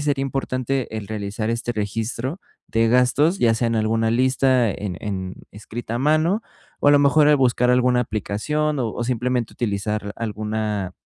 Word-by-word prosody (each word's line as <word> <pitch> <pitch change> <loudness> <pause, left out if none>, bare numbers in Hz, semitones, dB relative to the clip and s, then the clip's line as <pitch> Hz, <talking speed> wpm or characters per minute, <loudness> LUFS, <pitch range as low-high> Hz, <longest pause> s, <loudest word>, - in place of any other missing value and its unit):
sería 140 -2 +1
importante 130 -3 -2
el 105 -2 -5
realizar 105 +1 -4
este 115 +1 -2
registro 115 - -3 0.3
de 115 0 +1
gastos, 125 +9 +3
ya 115 -1 +3
sea 115 +1 0
en 115 - 0
alguna 110 +1 +1
lista, 130 0 +3
en 95 -4 -5
en 95 -3 -4 0.2
escrita 110 +2 -7
a 120 - -1
mano 155 - +2 0.4
o, - - +4
a - - +8
lo 145 - +6
mejor, 145 +1 +5
al 150 - +6
buscar 125 -1 +2
alguna 125 0 +3
aplicación, 140 +7 -1
o 115 -3 -1
o 120 - -3
simplemente 125 -1 -1
utilizar 105 -1 -2
alguna, 105 -3 -3
120 Hz, 170 wpm, -22 LUFS, 110-130 Hz, 0.4 s, a